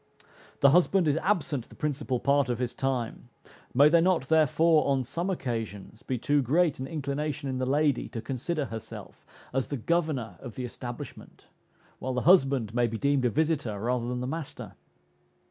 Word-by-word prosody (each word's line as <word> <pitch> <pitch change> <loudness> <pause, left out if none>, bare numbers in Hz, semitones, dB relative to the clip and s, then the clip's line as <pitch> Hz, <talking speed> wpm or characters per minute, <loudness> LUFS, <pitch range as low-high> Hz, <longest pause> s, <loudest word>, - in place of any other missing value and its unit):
The 140 - +7
husband 180 +1 +4
is 145 +1 +2
absent 160 - -1
the - - -14
principal 140 -4 -2
part 140 0 +2
of 120 - 0
his 125 0 -2
time, 125 -3 -3 0.4
may 140 +4 +6
there 165 +2 +5
not 175 -6 +1
therefore, 160 0 +4
on 135 -2 +2
some 170 +9 -3
occasions, 115 - -4
be 130 - -3
too 145 +4 +2
greet 155 +4 +2
an 130 - -4
inclination 145 0 -3
in 130 -1 -2
the 130 - -1
lady 145 -1 +1
to 115 - -5
consider 140 +6 -3
herself 110 -3 -9 0.3
as 135 0 0
the 140 - -3
governor 135 - -1
of 120 - -9
the 125 - -4
establishment, 120 0 -9 0.5
while 130 0 -3
the 125 - 0
husband 135 - +4
may 120 0 +2
be 115 0 -4
deemed 140 0 +1
a - - +4
visiter, 140 -6 0
rather 120 +2 -1
than 125 0 -3
the - - -2
master? 155 +2 -6
135 Hz, 180 wpm, -28 LUFS, 125-155 Hz, 0.5 s, The